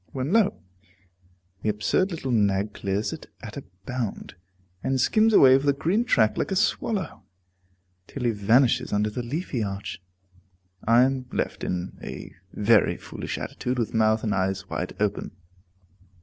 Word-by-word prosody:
When 135 +6 -2
lo! 210 - +3 1.0
the 110 - 0
absurd 105 - +1
little 160 -7 -4
nag 105 -2 +1
clears 100 +2 -2
it - - -9 0.2
at - - -8
a - - -6 0.2
bound, 125 -4 -4 0.5
and 130 0 0
skims 215 - +4
away 135 -11 +7
over 135 +2 +3
the 140 - +5
green 185 +11 0
track 110 - +3
like - - -1
a 195 - -1
swallow, 210 0 -1 0.9
till 135 - -6
he 120 - +3
vanishes 115 +5 +3
under 105 +1 +1
the 125 - -3
leafy 130 +1 -3
arch. 100 -2 -4 0.8
I 115 +3 +5
am 130 -1 0
left - - -3
in 90 0 -3
a - - -8 0.2
very - - +3
foolish - - -6
attitude, 125 +1 -3
with 115 -3 -1
mouth 110 0 +2
and 105 -3 0
eyes 95 0 -1
wide 90 - -4
open. 105 -3 -1
120 Hz, 155 wpm, -25 LUFS, 105-135 Hz, 1.0 s, away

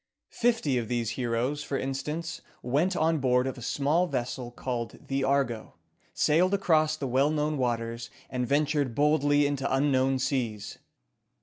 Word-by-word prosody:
Fifty 230 - +1
of 115 - -4
these 120 -2 -1
heroes, 125 +4 -1
for 140 - -2
instance, 150 +5 -4 0.2
went 150 +10 +1
on 160 0 +2
board 125 -1 +2
of 130 - -3
a 125 - -10
small 145 +8 +1
vessel 125 -3 -3
called 120 -2 -4
the 135 0 0
"Argo," 135 -5 0 0.4
sailed 180 +6 +3
across 155 -5 +2
the 145 - -4
well 135 +3 +2
known 150 0 0
waters, 115 -2 -2 0.2
and 125 -1 -2
ventured 145 -2 +1
boldly 145 -1 +3
into 140 -1 -1
unknown 135 -1 +2
seas. 125 -6 -2
135 Hz, 145 wpm, -28 LUFS, 125-150 Hz, 0.4 s, sailed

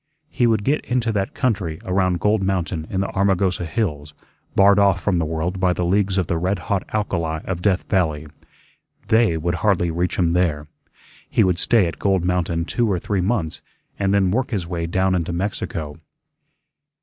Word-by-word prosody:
He 120 - +2
would 110 -3 +1
get 145 +6 +1
into 120 -2 0
that 100 -2 -2
country 95 - -1
around 90 -1 +1
Gold 105 +2 +2
Mountain 90 -4 -2
in 95 - -1
the 100 - -2
Armagosa 95 -2 +1
hills, 75 -8 -3 0.4
barred 100 +1 +6
off 100 -1 +4
from 90 -1 0
the 80 - 0
world 80 +4 -2
by 90 -1 +2
the 90 - -2
leagues 100 +1 +1
of 95 - +1
the 80 +1 -1
red 95 +4 0
hot 95 +1 -1
alkali 85 -7 -1
of 90 -2 -3
Death 95 -1 +1
Valley. 80 -5 0 0.8
"They" 110 -7 +3
would 85 +2 -1
hardly 95 -5 +2
reach 85 +2 -1
him 85 -2 +2
there. 85 -4 0 0.6
He - - +3
would 90 -2 +1
stay 115 -6 +3
at 85 - -5
Gold 95 -3 +1
Mountain 85 -2 0
two 115 +3 0
or 95 - +1
three 95 +2 -1
months, 90 -5 -1 0.4
and 95 -1 +1
then 100 -2 +2
work 125 +5 0
his 100 -7 -2
way 85 -1 -3
down 95 +2 +1
into 85 -1 -1
Mexico. 85 -5 -4
95 Hz, 185 wpm, -21 LUFS, 85-100 Hz, 0.8 s, barred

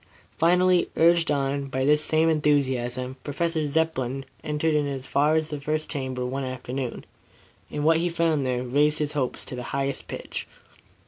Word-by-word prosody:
Finally, 180 +2 +4
urged 170 0 +4
on 140 -1 0
by 130 0 -1
this 150 +1 +4
same 160 +1 +2
enthusiasm, 130 -4 +1
Professor 160 +1 -1
Zepplin 135 -4 -1 0.2
ventured 150 +1 0
in 150 -1 +2
as 135 -2 -4
far 150 +4 +2
as 155 0 0
the 145 -1 -4
first 155 +2 -2
chamber 130 -3 -3
one 135 +2 -3
afternoon, 130 0 -4 0.6
and 145 - -3
what 160 +1 +5
he 175 +2 0
found 165 -3 +1
there 125 -1 -1
raised 145 +4 +2
his 150 -1 -1
hopes 140 -5 -2
to - - -6
the 125 - -5 0.2
highest 140 0 -1
pitch. - - -6
145 Hz, 170 wpm, -25 LUFS, 130-160 Hz, 0.6 s, what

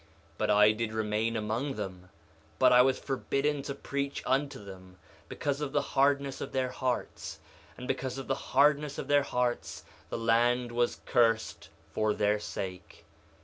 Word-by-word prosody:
1:17 - - -29 0.3
But - - 0
I 105 +1 +6
did 110 0 -3
remain 110 +1 0
among 115 +6 -2
them, 95 -3 -6 0.5
but - - +5
I 125 - +8
was 130 +1 +3
forbidden 140 +1 -1
to 140 0 -5
preach 140 0 -3
unto 135 +2 0
them, 95 -1 -12 0.3
because 145 0 -2
of 145 -1 -3
the - - +3
hardness 140 0 +2
of - - -5
their 130 -1 0
hearts; 130 -2 -3 0.4
and 125 - -7
because 130 -1 -2
of 135 - -5
the - - 0
hardness 145 +1 +2
of - - -5
their 145 0 +4
hearts 120 - -2 0.3
the - - -3
land 120 +2 +2
was 120 0 0
cursed 115 -3 +1 0.2
for 110 -1 +1
their 105 0 +2
sake. 95 -3 -7
120 Hz, 165 wpm, -30 LUFS, 110-140 Hz, 0.5 s, I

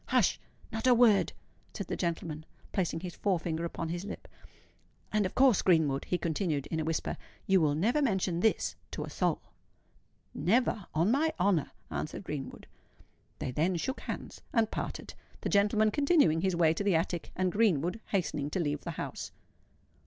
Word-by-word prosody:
"Hush! - - +3 0.3
not 225 +2 -1
a 250 - +7
word!" 230 -4 +5 0.4
said - - -3
the - - -3
gentleman, 165 -3 -3 0.3
placing 170 -4 -1
his 180 -1 -6
fore 195 -3 +1
finger 165 0 -2
upon 165 -1 -4
his 175 +2 -3
lip. 205 - -7 0.8
"And, 210 -2 +2
of - - -12
course, 255 -5 +5
Greenwood," 155 -6 +3
he 180 - 0
continued, 160 -4 -1
in 160 - 0
a - - 0
whisper, 160 0 -2 0.3
"you 190 -2 +4
will 145 -2 +2
never 230 - +2
mention 190 -9 +1
this 220 +4 +1
to - - -4
a - - -7
soul." - - 0 0.9
"Never—on 200 -4 +1
my 310 +5 +2
honour!" 180 -5 +2 0.2
answered 155 - -4
Greenwood. 150 -6 -6 0.7
They - - -3
then 165 +7 +1
shook 265 - -2
hands, - - -6
and 225 -3 +2
parted—the - - -6
gentleman 210 +1 +3
continuing 280 - +3
his 190 -1 +1
way 165 -2 +4
to 185 - -3
the 200 -3 +3
attic, 170 +1 -1
and 185 0 +1
Greenwood 190 -2 +2
hastening 155 -7 -1
to 185 - -2
leave 145 -3 -1
the - - -6
house. - - -5
180 Hz, 165 wpm, -31 LUFS, 160-210 Hz, 0.9 s, a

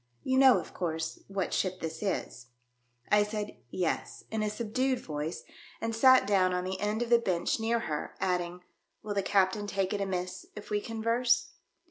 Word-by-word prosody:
"You 260 0 +2
know, 265 -2 +8
of - - -9
course, 160 -2 -3
what 195 -2 -2
ship 185 -1 0
this 160 -1 -5
is 125 - -3 0.3
?" 120 0 -34
I 210 - +6
said 210 0 -3
"Yes," 175 +5 -2
in 220 -1 -1
a 215 - +1
subdued 245 +4 -1
voice, 150 -1 -4 0.4
and 225 0 -2
sat 260 +1 +6
down 185 -2 +3
on 180 - -1
the 185 +1 -3
end 210 +3 0
of 240 - -6
the 235 - +7
bench 185 -2 0
near 230 +1 +1
her, 150 -7 -4
adding, 180 -1 -1 0.2
" - - -49
Will 210 -1 -3
the 200 - +1
captain 200 +1 +2
take 195 0 -1
it 205 - -1
amiss 185 -2 -3
if 210 - -9
we 210 0 +1
converse 230 +2 +1
200 Hz, 190 wpm, -30 LUFS, 180-225 Hz, 0.4 s, know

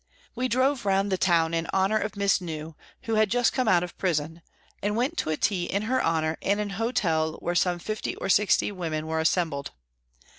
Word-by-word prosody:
We 250 +1 -1
drove 255 +1 +1
round 195 0 +1
the 190 - +1
town 170 -3 +2
in 165 0 -1
honour 195 +3 +2
of 210 - -4
Miss 200 -2 +2
New, 160 -2 -6 0.3
who 225 - -2
had 215 - +2
just 245 +1 +2
come 255 -3 0
out 175 -4 +4
of 180 - -7
prison, 165 -2 -1 0.4
and 205 +1 -1
went 255 +8 0
to - - -1
a 155 - 0
tea 185 -4 0
in 200 +3 -1
her 255 +4 0
honour 160 -1 0
in 200 +1 +1
an 210 -1 -3
hotel 180 -8 0
where 175 - -3
some 175 0 +2
fifty 215 +5 -4
or - - -5
sixty 205 +2 +3
women 160 -5 -3
were 160 0 -2
assembled. 160 -3 0
190 Hz, 210 wpm, -26 LUFS, 165-215 Hz, 0.4 s, out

